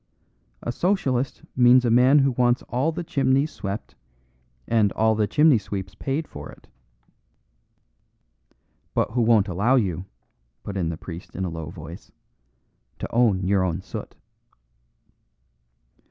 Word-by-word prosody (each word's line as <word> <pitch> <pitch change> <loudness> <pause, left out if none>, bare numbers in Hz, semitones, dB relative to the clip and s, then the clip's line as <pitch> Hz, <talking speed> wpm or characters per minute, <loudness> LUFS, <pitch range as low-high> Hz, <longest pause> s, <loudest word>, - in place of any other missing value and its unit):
A 120 - -2
Socialist 135 -6 -1
means 125 0 +6
a 120 - +2
man 125 +4 +5
who 135 -1 +4
wants 120 0 +1
all 130 +7 0
the 170 +2 -5
chimneys 140 -2 +1
swept 100 +2 -6 0.7
and 110 -3 +2
all 110 0 +2
the 105 -1 +1
chimney 150 +2 +4
sweeps 95 -2 -6
paid 135 +10 -3
for 75 0 -9
it." - - -15 2.3
"But - - +1
who 120 +1 0
won't 110 -3 +4
allow 105 +8 +2
you," 95 -7 0 0.6
put 100 - -6
in 90 -4 -1
the 80 - -4
priest 85 +1 -10
in 95 - -2
a - - -2
low 80 -2 -6
voice, 80 +1 -11 0.9
"to - - -6
own 110 -6 +3
your 95 0 +2
own 90 0 -2
soot." - - -8
115 Hz, 140 wpm, -24 LUFS, 95-130 Hz, 2.3 s, means